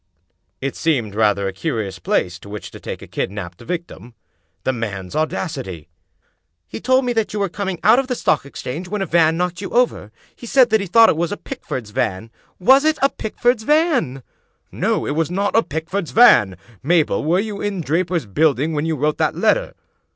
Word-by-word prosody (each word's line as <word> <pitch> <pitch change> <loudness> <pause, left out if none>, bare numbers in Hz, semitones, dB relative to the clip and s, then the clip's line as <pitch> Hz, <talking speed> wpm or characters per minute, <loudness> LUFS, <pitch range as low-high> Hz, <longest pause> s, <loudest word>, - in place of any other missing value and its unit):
" 85 +4 -50
It 135 +1 -3
seemed 125 -11 0
rather 105 -2 +2
a 95 - -4
curious 100 - -3
place 90 +1 -1
to 100 - -13
which 105 0 -7
to - - -11
take - - -7
a - - -11
kid - - -2
naped 95 -3 -8
victim. 160 - -6 0.5
The 130 - 0
man's 100 -6 -5
audacity! 135 - -3 0.4
" 85 +1 -49
He - - -7
told 260 +1 +3
me 245 - 0
that 225 -3 -1
you 210 - -2
were 200 -1 0
coming 190 -1 -4
out 225 +4 +6
of 270 - -2
the 250 - -1
Stock - - +1
Exchange 140 +4 -6
when 205 +1 -2
a - - -2
van 165 -2 +3
knocked 180 0 -2
you 195 - -5
over. 240 - 0 0.2
He 240 - -11
said 250 -2 +4
that 220 -1 +3
he 200 - -4
thought 225 +5 +6
it - - +2
was 170 +1 -1
a 205 - -3
Pickford's 130 - -6
van 110 0 -2 0.2
— - - -39
^was 265 +9 +5
it 310 0 +2
a 275 - +5
Pickford's 240 +1 -1
van? 280 - +1 0.2
" - - -44
" - - -46
No, - - -1
it - - -2
was 160 +1 0
not 200 +3 -1
a 225 - +6
Pickford's 165 +2 -4
van. 105 - +5 0.2
Mabel, 160 +2 +2
were 170 +5 +2
you 205 -1 -4
in 205 -2 -2
Draper's 170 0 -1
Buildings 150 +7 +1
when 150 +1 -1
you 160 - 0
wrote 150 +2 -1
that - - +1
letter? - - +1
165 Hz, 215 wpm, -20 LUFS, -, 0.5 s, out